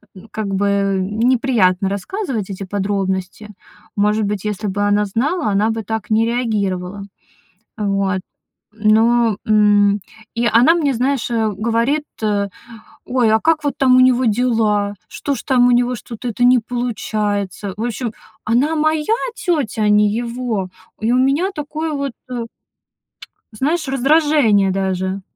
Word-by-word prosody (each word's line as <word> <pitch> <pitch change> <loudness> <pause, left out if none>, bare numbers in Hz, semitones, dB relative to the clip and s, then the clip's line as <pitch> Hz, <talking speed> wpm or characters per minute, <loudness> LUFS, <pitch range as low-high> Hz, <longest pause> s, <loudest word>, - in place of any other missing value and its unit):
н 190 +4 -13
как 215 -2 -4
бы 200 -1 +1
неприятно 215 -2 +1
рассказывать 220 - -4
эти 195 0 -6
подробности. 195 +1 -3 0.5
Может 210 +1 +1
быть, 205 -1 -3
если 210 0 -3
бы 200 +1 -2
она 205 0 +2
знала, 275 - -1
она 205 +2 +2
бы 225 0 -4
так 220 0 -4
не 220 +1 +3
реагировала. 205 -5 -2 0.7
Вот. 195 -2 0 0.5
Но, 225 +1 +3
м, 205 -1 +4 0.3
и 235 - 0
она 245 +9 +5
мне, 290 -5 +1
знаешь, 255 0 -1
э, 220 -2 +1
говорит, 230 +8 0 0.2
э: 200 -1 0 0.6
"Ой, 245 -3 +2
а 220 - +3
как 315 +1 +1
вот 285 - 0
там 255 -2 +4
у - - +6
него 255 0 +4
дела? 215 -3 +1
Что 285 - -3
ж 255 - -7
там 245 -2 +3
у - - +4
него, 245 +1 +2
что-то 235 +2 -7
это 240 +1 -1
не 250 +1 +6
получается?" 210 -5 -3
В 220 - -3
общем, 240 -1 -3 0.3
она 260 +8 +1
моя 310 +5 +1 0.2
тётя, 290 - -1
а - - +3
не 210 0 +4
его. 235 -4 -3 0.3
И 225 +2 +1
у - - +3
меня 275 +9 +2
такое 305 0 -4
вот, 280 -3 -3 0.2
э 240 -2 -3 1.1
знаешь, 305 +9 -1
раздражение 270 -7 +3
даже. 190 0 -2
220 Hz, 145 wpm, -18 LUFS, 205-255 Hz, 1.1 s, у